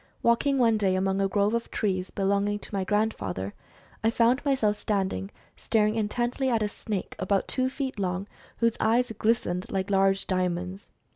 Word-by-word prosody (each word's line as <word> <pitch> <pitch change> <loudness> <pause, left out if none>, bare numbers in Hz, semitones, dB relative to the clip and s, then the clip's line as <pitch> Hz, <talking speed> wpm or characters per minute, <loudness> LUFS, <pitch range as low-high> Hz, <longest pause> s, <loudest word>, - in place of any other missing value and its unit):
Walking 255 +4 +3
one 230 -4 +3
day 190 -2 +2
among 190 +1 +1
a 195 - +3
grove 205 +2 +1
of 235 0 -1
trees 185 -4 -1
belonging 200 +1 0
to 205 - -8
my 195 -1 0
grand 210 +3 +1
father, 95 +1 -4 0.5
I 225 - +4
found 235 +3 +3
myself 260 -8 +2
standing 190 - -1 0.3
staring 215 -1 +1
intently 240 +4 0
at 230 -3 +2
a 210 - 0
snake 205 -2 -5
about 195 +1 +1
two 255 0 0
feet 265 -4 -4
long 185 +1 -2 0.3
whose 230 -1 +2
eyes 235 +2 +2
glistened 205 -5 0
like 195 0 -1
large 195 0 +3
diamonds. 185 +1 -2
205 Hz, 170 wpm, -27 LUFS, 190-230 Hz, 0.5 s, I